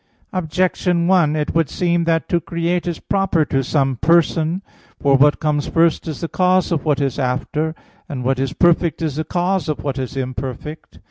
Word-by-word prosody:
Objection 180 0 0
1: 170 -5 +3
It 150 -1 -2
would 165 -3 +1
seem 175 -1 0
that 165 -1 +1
to 175 - +1
create 170 +2 -2
is 170 - -2
proper 195 -5 +1
to 135 -2 0
some 135 -1 0
Person. 165 - +2 0.4
For 140 -1 +3
what 145 +2 +4
comes 150 -2 0
first 165 0 +2
is 155 - -5
the 165 - -2
cause 185 +2 +2
of 165 -4 0
what 150 -3 +1
is 140 -1 -1
after; 150 +5 -1 0.3
and 135 -5 -4
what 130 +1 0
is 135 0 -1
perfect 170 -1 +2
is 150 -3 -2
the 155 - 0
cause 180 +2 -1
of 150 - -3
what 140 -2 -2
is 130 +1 -5
imperfect. 130 +3 -6
160 Hz, 190 wpm, -19 LUFS, 140-175 Hz, 0.4 s, what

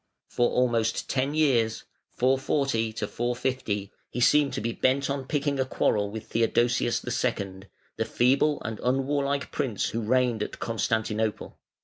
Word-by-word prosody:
For 120 - +2
almost 115 -3 +1
ten 135 +2 0
years 120 -8 +2 0.3
(440 130 -3 +1
450) 120 -2 -2 0.2
he 125 - -5
seemed 145 +3 +4
to 130 - -2
be 115 +2 -2
bent 135 +3 +1
on 140 -1 -3
picking 145 -1 0
a 130 - +2
quarrel 105 -5 +1
with 110 +1 -7
Theodosius 120 +1 +1
II., 95 -1 -2 0.3
the 115 - 0
feeble 135 +6 +2
and 110 -1 -4
unwarlike 140 +2 0
prince 130 -9 -1
who 115 - -3
reigned 120 0 +1
at - - -4
Constantinople. 110 -1 -2
120 Hz, 135 wpm, -27 LUFS, 110-135 Hz, 0.3 s, seemed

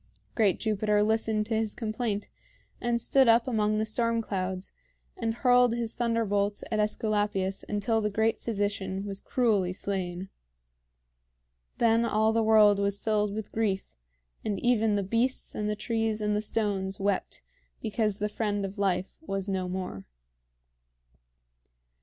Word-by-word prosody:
Great 210 -5 +2
Jupiter 210 -1 +1
listened 220 0 +1
to 225 - -3
his 220 -1 0
complaint, 215 -2 -2 0.5
and 240 0 +1
stood 265 +2 +4
up 230 +2 +5
among 215 -3 +1
the 215 - +1
storm 230 +1 0
clouds, 190 -3 -3 0.4
and 225 -1 -2
hurled 245 -1 +4
his 235 -1 -3
thunderbolts 210 -4 0
at 215 - 0
AEsculapius 205 -2 0
until 215 +2 +1
the 210 - 0
great 220 +2 +1
physician 200 -3 -2
was 195 -1 -5
cruelly 210 -8 +1
slain. 185 -1 -4 1.5
Then 230 0 +3
all 220 -1 +2
the 225 - +2
world 215 -2 +5
was 200 0 0
filled 210 -1 0
with 210 0 -5
grief, 205 - -1 0.5
and 205 -3 -2
even 225 -3 +2
the 200 - 0
beasts 230 +6 0
and 210 0 -2
the 210 - 0
trees 225 0 -1
and 210 -1 0
the 210 - 0
stones 200 -3 -2
wept 200 0 -2 0.4
because 215 -2 -1
the 210 - -1
friend 205 -1 -2
of 195 +1 -7
life 190 -2 0
was 195 -10 -3
no 190 -2 -1
more. 180 - -5
210 Hz, 145 wpm, -28 LUFS, 200-225 Hz, 1.5 s, up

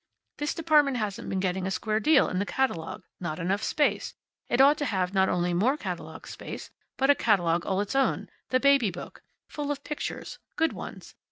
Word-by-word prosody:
This 295 0 -2
department 300 -5 +3
hasn't 210 -3 -3
been 190 - -1
getting 185 0 -1
a - - -1
square 215 +2 0
deal 295 +3 +5
in 185 - -2
the 200 - 0
catalogue. 255 -12 -1 0.2
Not 170 -3 -3
enough 190 +4 -1
space. 295 -1 0 0.3
It 240 - +1
ought 285 +3 +6
to 290 - 0
have 190 -6 -1
not 190 -1 +3
only 175 0 +1
more 235 +11 +2
catalogue - - -6
space, - - -8 0.3
but 270 +1 +5
a - - +7
catalogue 175 -9 +2
all 190 0 +1
its 205 +6 -4
own 270 -1 +1 0.2
the 255 - +3
Baby 275 -5 +4
Book. 180 -1 -9 0.3
Full 290 -1 -4
of 285 -1 -3
pictures. 300 - -5 0.2
Good 325 0 +1
ones. - - -9
220 Hz, 195 wpm, -27 LUFS, 185-280 Hz, 0.3 s, a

